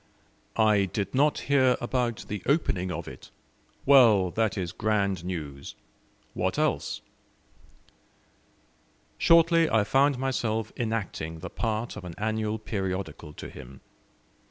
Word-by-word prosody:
"I 105 Hz, -3 st, +4 dB
did 100 Hz, +1 st, -3 dB
not 145 Hz, +3 st, +2 dB
hear 130 Hz, -3 st, +3 dB
about 120 Hz, -1 st, -2 dB
the 105 Hz, -2 st, -4 dB
opening 100 Hz, -, +1 dB
of -, -, -5 dB
it. -, -, -11 dB, 0.6 s
Well, 115 Hz, -10 st, +6 dB
that 110 Hz, -1 st, 0 dB
is 90 Hz, -3 st, -2 dB
grand 100 Hz, -4 st, 0 dB
news! 75 Hz, -6 st, -6 dB, 0.6 s
What -, -, -1 dB
else?" -, -, -1 dB, 2.2 s
Shortly 165 Hz, 0 st, +5 dB
I 110 Hz, -1 st, +3 dB
found 135 Hz, +5 st, +3 dB
myself 115 Hz, -4 st, -2 dB
enacting 110 Hz, -8 st, -3 dB
the -, -, -7 dB
part 115 Hz, 0 st, -2 dB
of -, -, -8 dB
an 85 Hz, -2 st, -8 dB
annual 110 Hz, 0 st, -1 dB
periodical 95 Hz, -7 st, -4 dB
to -, -, -8 dB
him. 65 Hz, +1 st, -12 dB
110 Hz, 120 wpm, -27 LUFS, 95-125 Hz, 2.2 s, Well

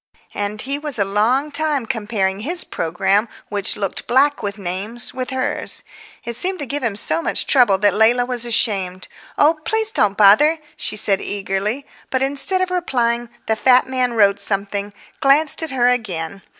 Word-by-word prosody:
And 205 Hz, +1 st, -4 dB
he 275 Hz, +2 st, -2 dB
was 295 Hz, -4 st, -5 dB
a 200 Hz, -, +1 dB
long 235 Hz, +9 st, 0 dB
time 295 Hz, -4 st, 0 dB
comparing 205 Hz, -4 st, -2 dB
his 340 Hz, +11 st, +5 dB
programme, 190 Hz, +6 st, -1 dB, 0.2 s
which 205 Hz, 0 st, -1 dB
looked 195 Hz, -3 st, -4 dB
black 280 Hz, +4 st, +2 dB
with 205 Hz, -1 st, -5 dB
names, 200 Hz, +5 st, -2 dB
with 255 Hz, -1 st, -5 dB
hers. 260 Hz, -1 st, -2 dB, 0.4 s
It 235 Hz, -, -4 dB
seemed 370 Hz, +8 st, 0 dB
to 290 Hz, -, -5 dB
give 285 Hz, +3 st, -3 dB
him 230 Hz, -5 st, -2 dB
so 165 Hz, -5 st, -1 dB
much -, -, +4 dB
trouble 240 Hz, -8 st, +4 dB
that 205 Hz, +1 st, +2 dB
Leila 235 Hz, +3 st, +3 dB
was 245 Hz, -1 st, -3 dB
ashamed. 195 Hz, -6 st, 0 dB, 0.3 s
"Oh, 310 Hz, +2 st, +3 dB
please 440 Hz, +2 st, +1 dB
don't 205 Hz, -, 0 dB
bother," 215 Hz, +11 st, +5 dB, 0.2 s
she -, -, -3 dB
said 200 Hz, -2 st, +2 dB
eagerly. 205 Hz, +6 st, -3 dB, 0.2 s
But 260 Hz, 0 st, 0 dB
instead 285 Hz, +7 st, +2 dB
of 370 Hz, -1 st, -2 dB
replying 240 Hz, -9 st, -1 dB, 0.2 s
the 220 Hz, -, 0 dB
fat 250 Hz, +3 st, +4 dB
man 255 Hz, -2 st, -1 dB
wrote 200 Hz, -2 st, +3 dB
something, 200 Hz, 0 st, -2 dB, 0.3 s
glanced 285 Hz, +3 st, +2 dB
at 320 Hz, -, -3 dB
her 250 Hz, -3 st, +1 dB
again. 195 Hz, -7 st, -2 dB
235 Hz, 175 wpm, -19 LUFS, 200-275 Hz, 0.4 s, his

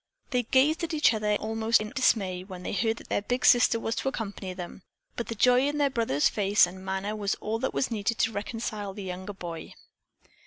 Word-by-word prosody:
They 250 Hz, -2 st, +2 dB
gazed 270 Hz, +7 st, +2 dB
at 330 Hz, -1 st, -2 dB
each 300 Hz, -5 st, +4 dB
other 210 Hz, -1 st, 0 dB
almost 225 Hz, +2 st, +1 dB
in 215 Hz, 0 st, -5 dB
dismay 190 Hz, -8 st, +1 dB
when 185 Hz, -2 st, -9 dB
they -, -, -4 dB
heard 225 Hz, +3 st, 0 dB
that -, -, -13 dB
their -, -, 0 dB
big 245 Hz, +5 st, -1 dB
sister 240 Hz, -1 st, +5 dB
was 225 Hz, -, -2 dB
to 270 Hz, -, 0 dB
accompany 205 Hz, -6 st, -5 dB
them, 180 Hz, +1 st, -8 dB, 0.3 s
but 235 Hz, -, -4 dB
the 230 Hz, -, -4 dB
joy 250 Hz, +4 st, +4 dB
in 295 Hz, +1 st, -2 dB
their 285 Hz, -2 st, +2 dB
brother's 225 Hz, -, +2 dB
face 205 Hz, -1 st, +4 dB
and 185 Hz, +2 st, -10 dB
manner 190 Hz, +2 st, -3 dB
was 205 Hz, -1 st, -1 dB
all 220 Hz, +1 st, -3 dB
that 265 Hz, -, -2 dB
was 260 Hz, -, 0 dB
needed 220 Hz, +1 st, -1 dB
to 225 Hz, -, +2 dB
reconcile 210 Hz, -2 st, -4 dB
the 205 Hz, -, -6 dB
younger 185 Hz, +2 st, -6 dB
boy. 170 Hz, -4 st, -8 dB
215 Hz, 220 wpm, -27 LUFS, 195-240 Hz, 0.3 s, sister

